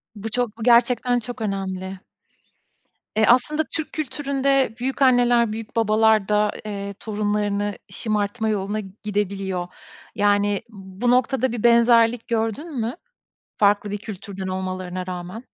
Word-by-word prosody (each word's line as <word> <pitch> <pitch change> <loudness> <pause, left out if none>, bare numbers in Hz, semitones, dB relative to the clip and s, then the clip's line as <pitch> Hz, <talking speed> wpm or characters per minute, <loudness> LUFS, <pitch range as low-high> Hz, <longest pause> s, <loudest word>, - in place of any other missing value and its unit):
Bu 215 +2 -5
çok 245 -2 -1
bu 225 - -6
gerçekten 245 +1 +4
çok 240 +1 -7
önemli. 190 -2 -3 1.2
E 220 0 +4
aslında 280 +7 +3
Türk 315 -2 -4
kültüründe 275 -4 0
büyükanneler 245 -3 +3
büyükbabalar 220 -1 +2
da 210 0 +3
eee 200 -1 -5
torunlarını 205 -1 -1
şımartma 215 0 -1
yoluna 205 0 -1 0.2
gidebiliyor. 195 -3 -2 0.5
Yani 205 0 +2
bu 200 +3 -2
noktada 260 +1 +2
bir 235 -2 -4
benzerlik 235 0 +4
gördün 235 +6 -2
mü? 230 +3 -2 0.6
Farklı 205 0 +3
bir 205 - -2
kültürden 195 -2 -7
olmalarına 185 -1 -4
rağmen? 180 +6 -6
215 Hz, 115 wpm, -23 LUFS, 200-240 Hz, 1.2 s, gerçekten